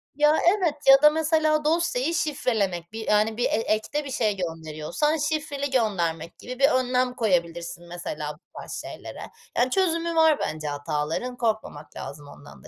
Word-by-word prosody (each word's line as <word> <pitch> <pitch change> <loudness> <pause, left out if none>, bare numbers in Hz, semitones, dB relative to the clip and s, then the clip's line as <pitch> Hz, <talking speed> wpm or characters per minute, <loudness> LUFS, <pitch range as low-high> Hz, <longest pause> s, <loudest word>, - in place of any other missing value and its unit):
Ya, 300 +1 +4
evet 355 -4 +3 0.2
ya 270 +1 +9
da 300 - +9
mesela 310 -1 +1
dosyayı 330 -2 +1
şifrelemek 220 - -1
bir, 220 0 -6
yani, 215 +1 +2
bir 245 - +1
e - - +4
ekte 225 +7 -1
bir 275 - -6
şey 215 -5 +1
gönderiyorsan 165 - -2
şifreli 295 -2 -2
göndermek 175 - -1
gibi 250 +1 -8
bir 275 - +6
önlem 255 -2 +1
koyabilirsin 175 -5 -1
mesela 155 -4 -5
bu 150 - -21 0.2
tarz - - -9
şeylere. - - -9 0.4
Yani, 245 +2 +3
çözümü 335 -3 +1
var 320 -2 +5
bence 155 -1 -3
hataların 150 +11 -3
korkmamak 215 -10 -3
lazım 145 0 -8
ondan 145 0 -14
da. - - -12
240 Hz, 160 wpm, -25 LUFS, -, 0.4 s, ya